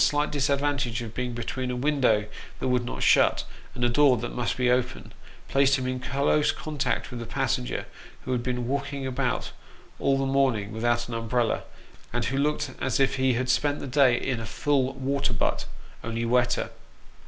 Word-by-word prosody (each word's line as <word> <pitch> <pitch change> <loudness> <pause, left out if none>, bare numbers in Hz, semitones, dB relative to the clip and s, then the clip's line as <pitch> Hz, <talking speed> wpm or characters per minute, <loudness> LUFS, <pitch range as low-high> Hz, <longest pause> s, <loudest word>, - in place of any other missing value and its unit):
slight 145 0 +2
disadvantage 140 -4 0
of 110 -1 -8
being 125 0 -3
between 125 +2 -3
a 125 - -2
window 125 -6 +2 0.3
that - - -1
would 125 -1 +2
not 120 - -4
shut, - - +4 0.3
and 120 - -3
a - - +5
door 135 +1 +5
that 120 +2 -5
must 120 -2 -1
be 125 -1 +2
open, 125 0 0 0.3
placed 140 0 +4
him 130 - -3
in 130 0 -2
close 140 +4 +2
contact 145 -5 -2
with 120 -1 -5
a - - -5
passenger, 135 -2 -1 0.4
who - - -4
had 125 -2 +1
been 125 -1 -2
walking 140 0 -2
about 130 -1 -1 0.5
all 135 0 +2
the 135 - 0
morning 130 -7 +1
without 120 +2 0
an 120 - -6
umbrella, 115 0 0 0.5
and 120 0 -1
who 135 - -1
looked 150 -1 0
as 130 -1 0
if 135 0 +2
he 130 -1 +3
had 125 +2 -1
spent 145 +3 +1
the - - -6
day 130 -2 +4
in 130 -3 -2
a 115 - -5
full 135 +2 +1
water 135 0 -1
butt - - 0 0.4
only 115 0 -2
wetter. 120 +1 +1
130 Hz, 190 wpm, -26 LUFS, 120-140 Hz, 0.5 s, a